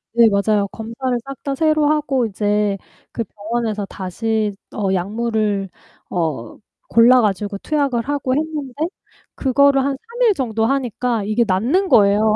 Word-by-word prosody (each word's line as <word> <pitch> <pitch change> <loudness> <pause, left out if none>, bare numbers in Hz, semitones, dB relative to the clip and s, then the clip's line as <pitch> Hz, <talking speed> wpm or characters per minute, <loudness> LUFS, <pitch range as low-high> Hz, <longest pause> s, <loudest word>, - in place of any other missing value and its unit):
네, 235 -1 +7
맞아요. 200 0 +1
검사를 230 +4 -4
싹 275 -1 -7
다 280 - -2
새로 310 +1 +2
하고 285 -5 +1
이제 205 -1 0 0.3
그 230 - -2
병원에서 215 0 -3
다시 210 +3 -2 0.2
어 200 -3 0
약물을 205 +1 -1 0.4
어 155 -10 -3 0.3
골라 240 +2 +6
가지고 205 -1 -1
투약을 280 -4 0
하고 280 -3 0
했는데 300 -3 -3 0.6
그거를 275 +1 +3
한 280 - +1
3 470 - -10
일 430 - +5
정도 225 - -1
하니까 245 -3 -1
이게 215 +4 +1
낫는 245 - +1
거예요. 210 -1 +4
230 Hz, 275 characters per minute, -20 LUFS, 205-270 Hz, 0.6 s, 네